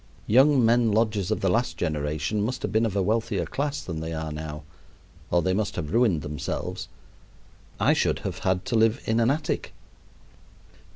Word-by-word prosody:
Young 130 +2 +5
men 115 0 +4
lodgers 105 -3 +1
of 110 - -1
the 95 - +2
last 120 +4 0
generation 75 +5 -1
must 125 +5 -2
have - - -2
been 110 +3 +2
of 100 - -5
a 100 - +2
wealthier 110 +1 0
class 145 +1 -3
than 80 -3 -5
they 80 +1 -4
are 80 -1 -4
now, 75 0 -6 0.7
or 85 -1 +2
they 95 - +1
must 100 +1 -1
have 75 +3 -4
ruined 110 - +3
themselves. 75 -2 -4 0.9
I - - +4
should - - +1
have - - -3
had 95 0 0
to - - -1
live 110 +3 +3
in 110 +1 +1
an 115 +1 +3
attic. 150 +3 -2
105 Hz, 180 wpm, -26 LUFS, 80-115 Hz, 0.9 s, Young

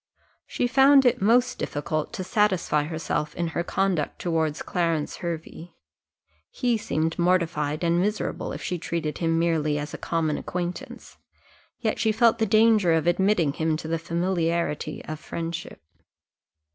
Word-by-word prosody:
She - - -1
found 270 +2 +6
it 245 - +3
most 245 +4 +3
difficult 155 +1 -3
to 200 -5 -4
satisfy 185 -8 +1
herself 155 -1 -3
in 170 -1 -1
her 165 - -2
conduct 180 -4 -1
towards 160 -3 -1
Clarence 165 -4 -1
Hervey: 170 0 -6 0.7
he 245 -2 0
seemed 165 -6 -2
mortified 170 -4 +1
and 170 +1 +2
miserable 210 +2 -2
if - - -6
she 180 - -3
treated 160 -2 -3
him 165 -1 +1
merely 160 -3 +1
as 150 0 -5
a - - -6
common 160 -3 -1
acquaintance, 175 0 -6 0.6
yet 220 -3 -1
she 220 - +2
felt 230 +1 +3
the 220 - +2
danger 215 -4 +4
of 160 -1 +1
admitting 175 -3 +2
him 160 0 0
to 155 - -7
the 165 0 -1
familiarity 170 -2 -1
of 155 -1 -6
friendship. 165 0 -6
170 Hz, 145 wpm, -25 LUFS, 160-195 Hz, 0.7 s, found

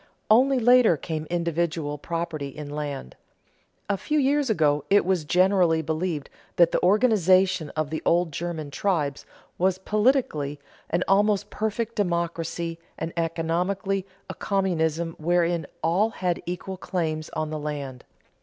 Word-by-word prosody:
Only 260 +4 +5
later 245 -7 +5
came 155 +1 -5
individual 170 -3 -1
property 165 -3 -3
in 145 +1 -8
land. 145 - -5 0.7
A 200 - 0
few 305 +9 -1
years 285 -1 +2
ago 150 -8 +2
it 205 -2 +4
was 180 -4 0
generally 180 -2 +3
believed 160 -1 -2 0.3
that 170 -1 +5
the - - +1
organization 185 - +3
of 155 -1 -2
the 160 - -3
old 170 -1 +2
German 160 -2 -4
tribes 150 -6 -1 0.3
was 185 +1 +2
politically 210 - +1 0.3
an 175 +2 +1
almost 205 +1 +2
perfect 220 +1 -2
democracy, 170 -2 -2 0.2
and 165 +1 -4
economically 180 +4 -1 0.2
a - - -5
communism 170 -4 -1
wherein 170 -1 +1 0.2
all 185 +7 +2
had 180 -5 -2
equal 180 +2 -5
claims 160 -4 -3
on 155 0 -2
the 155 - -3
land. 140 -4 -5
170 Hz, 135 wpm, -25 LUFS, 155-195 Hz, 0.7 s, Only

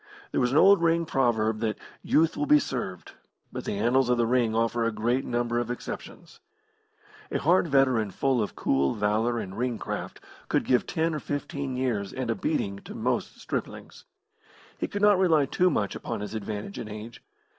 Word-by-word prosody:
There - - +1
was 125 0 +2
an 140 - +2
old 195 +2 +7
ring 170 0 +2
proverb 110 -6 +1
that 110 -2 -1 0.2
"Youth 160 +1 +2
will 290 0 -1
be 300 +1 +7
served," 120 - -4 0.4
but - - -6
the 100 - -2
annals 120 +4 +2
of 125 - +3
the 120 - +2
ring 115 -2 +1
offer 115 +1 +1
a 115 - +1
great 120 +5 0
number 120 0 0
of 120 -1 -3
exceptions. 125 - -7 0.9
A - - +1
hard 175 +3 +3
veteran 130 -7 +3
full 130 +5 +1
of 105 - -3
cool 70 0 +1
valour 110 +3 +1
and 95 -4 -5
ring 120 -1 -1
craft, - - -5 0.3
could - - +1
give 125 -2 +2
ten 165 -1 0
or 155 - -2
fifteen 140 -2 -4
years 115 -7 -1
and 130 -3 -2
a - - 0
beating 100 -10 -2
to - - -10
most - - -2
striplings. - - -6 0.7
He - - -1
could 205 0 -4
not 205 -2 +6
rely 160 -6 +4
too 180 +7 +2
much 105 - -1
upon - - -5
his 105 - -5
advantage 110 - -5
in 110 - -6
age. 110 +2 -8
120 Hz, 190 wpm, -27 LUFS, 110-145 Hz, 0.9 s, old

